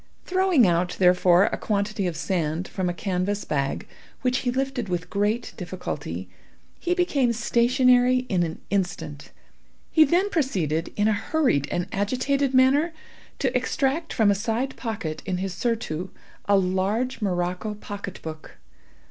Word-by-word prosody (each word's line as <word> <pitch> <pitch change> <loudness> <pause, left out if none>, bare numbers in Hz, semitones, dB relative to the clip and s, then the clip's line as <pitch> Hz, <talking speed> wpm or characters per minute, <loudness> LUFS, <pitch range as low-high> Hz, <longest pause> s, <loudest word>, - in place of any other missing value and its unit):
Throwing 370 - +4
out, 175 0 +1
therefore, 180 0 +5
a - - 0
quantity 205 -1 -1
of 165 -3 -3
sand 170 -2 -1
from 185 -2 -2
a - - +1
canvas 190 +3 -2
bag, 140 -2 -1 0.4
which, 255 0 +2
he 250 - -1
lifted 260 -4 -2
with 175 -1 -3
great 210 +4 0
difficulty, - - -5 0.5
he 355 0 0
became 290 -9 +2
stationary 250 +2 +3
in 185 -6 +1
an 165 -2 -2
instant. 165 -7 -2 0.6
He 315 - +7
then 355 +7 +2
proceeded, 180 - 0
in 205 0 +2
a 220 - +3
hurried 245 - +1
and 175 - -1
agitated 255 +7 0
manner, 270 +6 +4 0.4
to - - -1
extract 290 +4 0
from 215 -4 +3
a - - +4
side 230 +6 -2
pocket 205 -10 -4
in 185 -2 0
his 190 0 -3
surtout 190 -4 -2 0.4
a 200 0 +4
large 195 +7 0
morocco 180 +2 -1
pocket 200 -2 -7
book. 155 -1 -8
205 Hz, 145 wpm, -25 LUFS, 180-255 Hz, 0.6 s, He